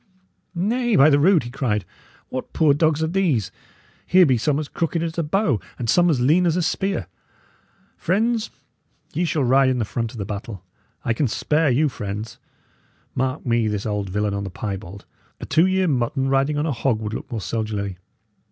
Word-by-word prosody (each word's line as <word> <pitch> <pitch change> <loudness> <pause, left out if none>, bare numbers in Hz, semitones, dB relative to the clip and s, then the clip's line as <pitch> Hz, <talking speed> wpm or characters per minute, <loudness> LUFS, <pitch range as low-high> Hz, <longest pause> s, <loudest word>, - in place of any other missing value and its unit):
"Nay, 230 +6 +1
by 155 -1 +6
the 140 - +4
rood!" 170 0 +4
he 120 - -7
cried, 120 -7 -1 0.4
"what 130 - -6
poor 155 -3 +4
dogs 155 +1 +2
are - - +1
these? 160 - 0 0.6
Here 185 0 +6
be 130 -4 +3
some 140 +5 +1
as 155 - -4
crooked 165 +1 -2
as 165 -1 -3
a - - +3
bow, 155 - +1 0.2
and 120 - -4
some 175 +9 +4
as 145 -6 +2
lean 160 +8 +3
as 165 - +2
a 180 - +1
spear. 195 - -1 0.9
Friends, 225 +5 0 0.6
ye 175 - 0
shall 155 -3 0
ride 130 +1 +4
in 130 - 0
the 115 - 0
front 115 +1 -3
of - - -11
the 100 - -3
battle; 100 -1 -6 0.4
I 115 - +2
can 135 +4 0
spare 150 +6 +1
you, 140 +5 +3
friends. 105 -3 -6 0.7
Mark 130 +3 -2
me 115 -2 +2
this 105 -1 -2
old 105 -3 -2
villain 105 +2 -1
on 100 0 -3
the 100 - -5
piebald! 100 0 -6 0.3
A - - -6
two 165 +4 +3
year 190 0 +1
mutton 135 -1 0
riding 135 +2 +1
on 150 - 0
a 160 - 0
hog 120 -3 0
would 110 -1 -4
look - - -6
more 115 - -2
soldierly! 100 -1 -3
135 Hz, 200 wpm, -22 LUFS, 110-165 Hz, 0.9 s, by